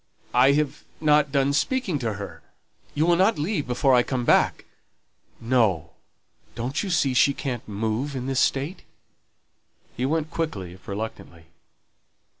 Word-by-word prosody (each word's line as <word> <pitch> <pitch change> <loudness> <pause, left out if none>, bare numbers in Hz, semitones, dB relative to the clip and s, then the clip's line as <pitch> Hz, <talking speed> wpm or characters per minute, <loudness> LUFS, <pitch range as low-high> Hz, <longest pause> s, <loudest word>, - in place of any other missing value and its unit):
"I 130 +3 +5
have 150 -1 -1 0.2
not 150 -2 +3
done 140 0 +2
speaking 190 - 0
to 115 -4 -2
her; 100 0 -8 0.5
you 155 +2 +2
will 175 0 +4
not 190 +6 +3
leave 150 0 -2
before 125 +2 +2
I 125 - +6
come 125 0 -2
back?" - - +3 0.7
"No. 110 -10 +1 0.6
Don't 125 +5 -2
you 200 - -4
see 150 -6 +2
she 140 +2 +4
can't 125 -5 -4
move 110 +7 -2
in 125 -1 -4
this 135 -1 0
state?" 145 +7 0 1.1
He 125 +2 -1
went 160 +1 -1
quickly, 100 - -3
if 95 +1 -18
reluctantly. 100 -5 -7
135 Hz, 145 wpm, -24 LUFS, 115-150 Hz, 1.1 s, I